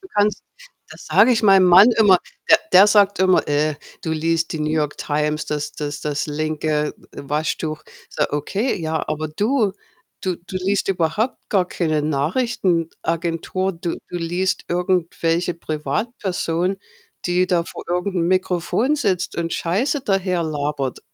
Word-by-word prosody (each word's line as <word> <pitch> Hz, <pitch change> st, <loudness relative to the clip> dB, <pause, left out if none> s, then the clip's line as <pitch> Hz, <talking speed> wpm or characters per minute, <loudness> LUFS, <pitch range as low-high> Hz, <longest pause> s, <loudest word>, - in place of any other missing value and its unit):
Du 380 Hz, -, -14 dB
kannst 210 Hz, 0 st, +1 dB, 0.5 s
das -, -, -12 dB
sage 230 Hz, +5 st, +5 dB
ich 225 Hz, -1 st, +1 dB
meinem 195 Hz, -2 st, +6 dB
Mann 185 Hz, +7 st, +8 dB
immer, 195 Hz, -4 st, +6 dB, 0.3 s
der -, -, +7 dB
der 190 Hz, +3 st, +8 dB
sagt 205 Hz, -1 st, +4 dB
immer: 185 Hz, -1 st, +3 dB
„Äh, 150 Hz, +1 st, +1 dB, 0.3 s
du 160 Hz, -, -2 dB
liest 165 Hz, +1 st, 0 dB
die 160 Hz, -, -4 dB
New 150 Hz, 0 st, -1 dB
York 150 Hz, -2 st, -1 dB
Times, 150 Hz, +1 st, -1 dB
das 150 Hz, 0 st, -3 dB
das 145 Hz, -1 st, -5 dB
das 145 Hz, 0 st, -2 dB
linke 150 Hz, 0 st, -1 dB, 0.2 s
W -, -, -8 dB
Waschtuch.“ 155 Hz, +1 st, -2 dB, 0.3 s
Sage: -, -, -2 dB
„Okay, 195 Hz, -, -1 dB
ja, 160 Hz, 0 st, -2 dB
aber 155 Hz, 0 st, -2 dB
du 210 Hz, -, +1 dB, 0.5 s
du 185 Hz, -2 st, -1 dB
du 185 Hz, +2 st, -8 dB
liest 195 Hz, +2 st, 0 dB
überhaupt 195 Hz, +6 st, 0 dB
gar 190 Hz, -3 st, +2 dB
keine 155 Hz, -4 st, -1 dB
Nachrichtenagentur. 170 Hz, -, -1 dB
Du 170 Hz, 0 st, -4 dB
Du -, -, -5 dB
liest 175 Hz, +2 st, -1 dB
irgendwelche 175 Hz, -1 st, 0 dB
Privatpersonen, 180 Hz, +1 st, -2 dB, 0.5 s
die 180 Hz, +1 st, +2 dB
da 170 Hz, -2 st, +2 dB
vor -, -, -9 dB
irgend 180 Hz, +2 st, -1 dB
'nem 170 Hz, -1 st, +1 dB
Mikrofon 185 Hz, -, +1 dB
sitzt 195 Hz, -, -1 dB
und 165 Hz, -1 st, -2 dB
Scheiße 245 Hz, -, 0 dB
daher 190 Hz, -5 st, 0 dB
labert.“ 145 Hz, -3 st, -3 dB
175 Hz, 150 wpm, -21 LUFS, 155-195 Hz, 0.5 s, Mann